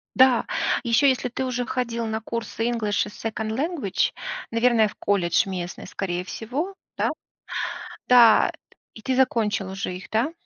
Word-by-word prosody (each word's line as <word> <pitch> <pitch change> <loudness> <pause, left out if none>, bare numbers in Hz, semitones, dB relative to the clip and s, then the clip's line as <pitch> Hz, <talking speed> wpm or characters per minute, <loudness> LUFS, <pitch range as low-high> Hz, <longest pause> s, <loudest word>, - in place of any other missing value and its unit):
Да. 260 -2 +5 0.4
Еще, 250 +4 +4
если 255 -1 0
ты 250 +2 -3
уже 250 -1 -2
ходил 235 -2 -2
на 220 0 -2
курсы 230 0 -3
English 215 -4 0
и - - -7
Second 220 +1 -4
Language, 275 - 0 0.4
наверное, 230 -1 +3
в 205 - -10
колледж 185 -3 +1
местный, 180 -2 -5
скорее 180 -2 -3
всего, 260 - -4 0.2
да? - - +1 1.0
Да. 240 -3 +7 0.4
И 220 - -12
ты 260 +3 -1
закончил 215 -6 +1
уже 190 -1 -4
их, 185 - -10
да? 235 +9 +1
230 Hz, 150 wpm, -24 LUFS, 205-250 Hz, 1.0 s, Да